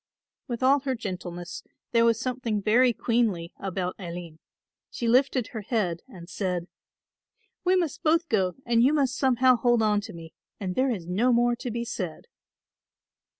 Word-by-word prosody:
With 240 -1 -4
all 275 +2 +5
her 265 -1 -2
gentleness 180 -5 -6 0.3
there 230 -1 +4
was 230 -1 +3
something 245 -4 -2
very 235 +5 +4
queenly 220 -8 0
about 185 -2 -3
Aline. 170 -3 -7 0.5
She 235 - -3
lifted 255 0 +3
her 220 - -6
head 190 -6 -1
and 180 -9 -12
said, 180 -2 -2 1.0
"We 370 +1 +3
must 340 -6 -1
both 330 +1 +2
go 190 - +1
and 235 -1 +3
you 265 +5 +4
must 275 -4 +1
somehow 255 -1 +4
hold 240 -1 +3
on 210 -1 +2
to 215 +1 -8
me 165 -1 -11 0.3
and 190 -3 -3
there 260 +6 +1
is 200 -9 -3
no 205 +9 +2
more 240 0 +3
to 245 - -5
be 235 +1 -3
said." 180 -8 -5
230 Hz, 165 wpm, -26 LUFS, 185-255 Hz, 1.0 s, all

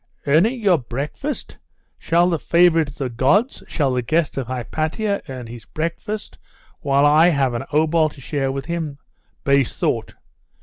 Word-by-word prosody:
'Earning 180 - +3
your 190 -7 +3
breakfast! 140 - -5 0.4
Shall 170 +2 +2
the 165 - 0
favourite 170 -2 +4
of 140 - -11
the 135 - -2
gods 135 - +1
shall 140 -5 0
the 125 - 0
guest 155 +5 0
of 135 -4 -3
Hypatia 155 - -2
earn 130 -2 -6
his 115 0 -10
breakfast, 170 +7 -5 0.4
while 140 0 +2
I 155 +3 +6
have 135 -6 +1
an 120 - -3
obol 155 +1 +3
to 145 - -16
share 135 0 -2
with 135 0 -4
him? 160 -3 -4 0.5
Base 140 -2 +2
thought! - - -1
150 Hz, 160 wpm, -21 LUFS, 135-170 Hz, 0.5 s, I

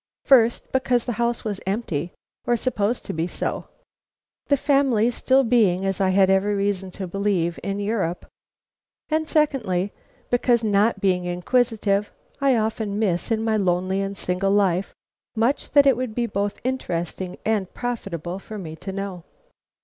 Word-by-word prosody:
First: 240 -4 +4
because 255 -2 +1
the 245 - -1
house 235 0 0
was 205 -2 -3
empty, 180 -6 -2 0.4
or 240 - +3
supposed 230 -2 -1
to - - -4
be 165 +1 -1
so, - - -3 0.8
the 285 - +3
family 260 -5 +2
still 265 +3 +3
being, 210 -6 +3
as 195 0 -1
I 190 - +3
had 190 0 +4
every 195 +2 +2
reason 195 -1 -1
to 195 - -3
believe, 180 -3 -1
in 200 0 -3
Europe; 200 -5 -2 0.8
and 315 0 0
secondly: 220 - +1 0.4
because, 240 -1 +3
not 205 0 +2
being 180 -2 +1
inquisitive, 205 +2 0 0.3
I 275 -2 +3
often 215 -2 -1
miss 190 -5 0
in 220 -1 0
my 220 -1 +1
lonely 185 0 0
and 195 0 -4
single 185 +1 0
life 195 -2 +2 0.4
much 230 +5 +1
that 285 -1 +7
it 270 -2 +5
would 245 -3 -4
be 240 - 0
both 205 -2 -2
interesting 180 -7 -3
and 210 -4 0
profitable 195 -7 -4
for 215 +2 -9
me 160 -5 -7
to 195 - -6
know. 190 -3 -5
205 Hz, 155 wpm, -23 LUFS, 190-235 Hz, 0.8 s, that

